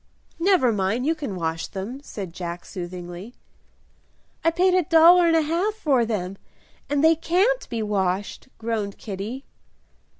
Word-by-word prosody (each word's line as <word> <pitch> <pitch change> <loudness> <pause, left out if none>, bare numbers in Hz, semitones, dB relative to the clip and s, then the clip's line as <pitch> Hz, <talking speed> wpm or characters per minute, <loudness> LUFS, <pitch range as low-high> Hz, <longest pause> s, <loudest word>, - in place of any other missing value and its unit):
"Never 340 -9 +3
mind, 210 +5 0
you 320 - +3
can 285 -11 -5
wash 165 -2 -3
them," 220 +8 -6
said 195 - -7
Jack, 175 -1 -6
soothingly. 180 +3 -8 1.1
"I 330 - +5
paid 360 +3 +2
a 370 - +4
dollar 340 +1 +6
and 330 - +3
a 320 - +3
half 350 +8 0
for 275 - +2
them, 195 -3 -3 0.5
and 290 0 +1
they 320 +1 +7
can't 390 +10 +1
be 230 -2 -2
washed," 200 +1 -2
groaned 220 -3 -3
Kitty. 215 +6 -6
235 Hz, 145 wpm, -24 LUFS, -, 1.1 s, they